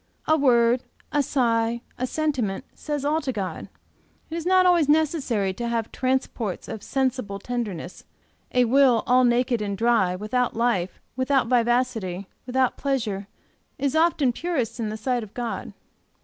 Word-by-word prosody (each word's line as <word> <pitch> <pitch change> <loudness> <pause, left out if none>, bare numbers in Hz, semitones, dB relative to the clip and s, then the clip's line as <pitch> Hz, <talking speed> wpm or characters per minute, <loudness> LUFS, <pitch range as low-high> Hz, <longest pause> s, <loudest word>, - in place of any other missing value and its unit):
A 315 - +5
word, 245 -4 +4 0.3
a 290 - +2
sigh, 235 -4 +1
a 255 - -2
sentiment, 260 -10 -1
says 295 -2 -4
all 310 +2 +1
to 275 - -2
God; 195 -6 -5 0.6
it - - -3
is 335 0 -3
not 370 0 +5
always 345 -5 +4
necessary 280 - +1
to 235 +5 -4
have 230 -1 -2
transports 255 -6 -2
of 220 - -6
sensible 255 -7 -1
tenderness; 200 -6 -5 0.5
a 250 -1 +3
will 250 -1 +4
all 255 +1 +4
naked 240 -1 +2
and 200 -1 -2
dry, 225 -6 +2
without 220 +5 -1
life, 220 -6 0 0.2
without 260 +1 +2
vivacity, 235 -6 +1 0.2
without 255 0 +1
pleasure, 220 -8 -2 0.5
is 280 0 -1
often 315 -6 +3
purest 275 -7 -2
in 220 -2 -1
the 215 - -4
sight 245 +2 -1
of 215 -2 -10
God. 240 -2 -4
245 Hz, 150 wpm, -24 LUFS, 225-275 Hz, 0.6 s, A